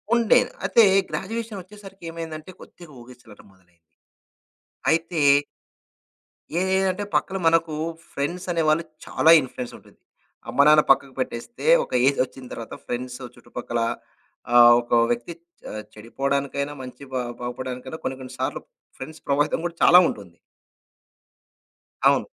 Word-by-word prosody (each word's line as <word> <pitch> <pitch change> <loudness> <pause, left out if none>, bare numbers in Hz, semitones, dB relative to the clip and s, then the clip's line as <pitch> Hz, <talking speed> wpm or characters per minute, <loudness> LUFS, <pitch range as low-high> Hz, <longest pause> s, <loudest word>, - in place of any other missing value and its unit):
ఉండే. 235 +1 +5 0.3
అయితే 230 - +5 0.3
గ్రాడ్యుయేషన్ 225 +1 -4
ఒచ్చేసరికి 195 -1 -14
ఏమైందంటే 165 +1 -7
కొద్దిగా 170 -3 -14
ఊగిసలాట 120 -3 -15
మొదలైంది. 90 -2 -29 1.1
అయితే 165 0 +1 1.4
ఏ - - +2
ఏంటంటే 190 +1 0
పక్కన 195 0 0
మనకు 165 -1 +2 0.4
ఫ్రెండ్స్ 175 +7 -4
అనే 165 -1 0
వాళ్ళు 160 +2 +2 0.2
చాలా 160 - +4
ఇన్‌ఫ్లుయెన్స్ 125 -1 -7
ఉంటుంది. - - -21 0.5
అమ్మనాన్న 150 +2 +6
పక్కకు 135 0 +2
పెట్టేస్తే 130 - -5 0.2
ఒక - - -12 0.2
ఏజొచ్చిన 130 -1 -1
తర్వాత 115 - -8
ఫ్రెండ్సు 125 +1 -5
చుట్టుపక్కల 120 -1 -5 0.8
ఆహ్, 120 0 +9
ఒక 120 - -18 0.2
వ్యక్తి 120 +8 -3 0.4
ఆహ్ 110 - -6
చె - - -21
చెడిపోవడానికైనా 140 +5 -2
మంచి 130 +2 -10
బ - - -3 0.3
బాగుపడడానికైనా 125 +3 -6
కొన్ని 130 - -3
కొన్ని 130 -1 -9
సార్లు - - -2 0.4
ఫ్రెండ్స్ 155 0 -9
ప్రభావితం 145 +3 +1
కూడా 170 - -3
చాలా 175 - +8
ఉంటుంది. - - -10 1.7
అవును. - - +3
140 Hz, 120 wpm, -23 LUFS, 125-170 Hz, 1.7 s, ఆహ్